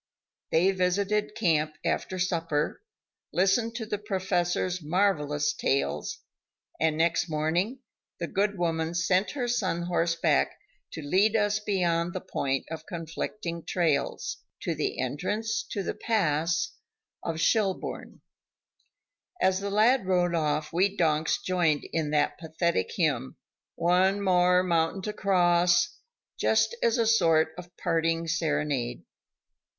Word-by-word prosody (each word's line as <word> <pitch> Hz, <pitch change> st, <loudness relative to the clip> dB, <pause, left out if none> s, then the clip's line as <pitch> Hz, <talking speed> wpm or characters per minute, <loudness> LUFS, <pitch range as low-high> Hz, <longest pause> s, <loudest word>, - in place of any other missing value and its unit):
They 180 Hz, +4 st, +4 dB
visited 200 Hz, +3 st, 0 dB
camp 155 Hz, -7 st, +1 dB
after 185 Hz, -, -1 dB
supper, 165 Hz, -, -1 dB, 0.5 s
listened 210 Hz, +5 st, +2 dB
to 230 Hz, -2 st, -3 dB
the 210 Hz, -1 st, -3 dB
Professor's 185 Hz, -2 st, -1 dB
marvelous 150 Hz, -4 st, +1 dB
tales, 135 Hz, -, -1 dB, 0.6 s
and 160 Hz, -1 st, +1 dB
next 165 Hz, 0 st, +1 dB
morning 170 Hz, -, -1 dB, 0.4 s
the 170 Hz, -, -1 dB
good 200 Hz, +3 st, 0 dB
woman 165 Hz, -1 st, -1 dB
sent 180 Hz, +3 st, +2 dB
her 245 Hz, -2 st, -1 dB
son 190 Hz, -8 st, 0 dB
horseback 170 Hz, -1 st, +1 dB, 0.4 s
to 160 Hz, -, -6 dB
lead 195 Hz, +9 st, +3 dB
us 210 Hz, -1 st, +2 dB
beyond 175 Hz, -5 st, 0 dB
the 185 Hz, -, -3 dB
point 135 Hz, -5 st, -2 dB
of 160 Hz, -1 st, -7 dB
conflicting 170 Hz, +1 st, -5 dB
trails, 155 Hz, -6 st, -1 dB, 0.2 s
to -, -, -1 dB
the -, -, -2 dB
entrance 205 Hz, -, -1 dB
to 200 Hz, -, -3 dB
the -, -, -2 dB
pass 170 Hz, -6 st, 0 dB, 0.5 s
to 165 Hz, -1 st, -3 dB
Schelbourne. 195 Hz, +2 st, -1 dB, 1.2 s
As 190 Hz, 0 st, +2 dB
the 200 Hz, 0 st, -3 dB
lad 215 Hz, +2 st, +3 dB
rode 180 Hz, -2 st, +2 dB
off 150 Hz, -1 st, -1 dB
we 195 Hz, +4 st, +1 dB
donks 155 Hz, -2 st, +2 dB
joined 170 Hz, -5 st, +1 dB
in 160 Hz, -2 st, 0 dB
that 150 Hz, -1 st, +1 dB
pathetic 160 Hz, -, -1 dB
hymn: 65 Hz, -, 0 dB, 0.4 s
"One 185 Hz, +3 st, +3 dB
more 180 Hz, -2 st, +3 dB
mountain 170 Hz, +1 st, 0 dB
to 210 Hz, -, -3 dB
cross," 175 Hz, -3 st, +3 dB, 0.4 s
just -, -, +2 dB
as 235 Hz, +1 st, +2 dB
a 230 Hz, -, +2 dB
sort 165 Hz, -8 st, +3 dB
of 175 Hz, 0 st, -11 dB
parting 165 Hz, -1 st, 0 dB
serenade. 150 Hz, -7 st, -1 dB
175 Hz, 125 wpm, -27 LUFS, 160-195 Hz, 1.2 s, They